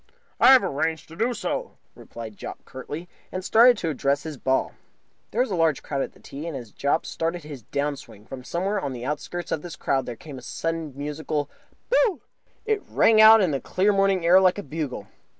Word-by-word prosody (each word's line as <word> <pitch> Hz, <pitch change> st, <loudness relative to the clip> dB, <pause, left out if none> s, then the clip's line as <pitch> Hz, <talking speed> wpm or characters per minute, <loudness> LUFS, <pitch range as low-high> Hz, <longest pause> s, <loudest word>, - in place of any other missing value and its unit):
"I -, -, +8 dB
have 260 Hz, -, +6 dB
arranged 160 Hz, +2 st, -2 dB
to 165 Hz, -, -11 dB
do 230 Hz, +7 st, 0 dB
so," -, -, -4 dB, 0.2 s
replied 115 Hz, -2 st, -10 dB
Jopp, -, -, -9 dB
curtly, 150 Hz, +6 st, -7 dB, 0.2 s
and 185 Hz, 0 st, -5 dB
started 240 Hz, +3 st, +6 dB
to 165 Hz, -, -2 dB
address 140 Hz, 0 st, 0 dB
his 155 Hz, -2 st, -6 dB
ball. 130 Hz, 0 st, 0 dB, 0.6 s
There 230 Hz, -, 0 dB
was 255 Hz, -, 0 dB
a -, -, 0 dB
large 165 Hz, -4 st, +1 dB
crowd 140 Hz, -2 st, -2 dB
at -, -, -4 dB
the -, -, -20 dB
tee, 145 Hz, +4 st, -8 dB
and, 160 Hz, -5 st, -4 dB
as 120 Hz, -5 st, -10 dB
Jopp 140 Hz, +8 st, 0 dB
started 165 Hz, +1 st, -3 dB
his 145 Hz, -4 st, -9 dB
down 140 Hz, +5 st, -2 dB
swing, 105 Hz, -6 st, -14 dB
from 130 Hz, +2 st, -9 dB
somewhere 190 Hz, +8 st, -1 dB
on 140 Hz, -5 st, -3 dB
the 120 Hz, 0 st, -6 dB
outskirts 160 Hz, +5 st, -4 dB
of 155 Hz, -, -1 dB
this 175 Hz, 0 st, -8 dB
crowd 135 Hz, -2 st, -1 dB
there 120 Hz, -, -5 dB
came 135 Hz, 0 st, -10 dB
suddenly 165 Hz, +4 st, -3 dB
a -, -, -16 dB
musical 150 Hz, 0 st, -3 dB, 0.4 s
"Boo!" 440 Hz, -, +3 dB, 0.4 s
It 435 Hz, -2 st, 0 dB
rang 220 Hz, -1 st, +5 dB
out 220 Hz, 0 st, +9 dB
in 180 Hz, -5 st, +2 dB
the 135 Hz, -, -2 dB
clear 200 Hz, +3 st, +1 dB
morning 195 Hz, -3 st, +2 dB
air 180 Hz, +3 st, +7 dB
like 185 Hz, 0 st, +4 dB
a 205 Hz, -, -4 dB
bugle. 150 Hz, -, -5 dB
160 Hz, 215 wpm, -25 LUFS, 140-190 Hz, 0.6 s, out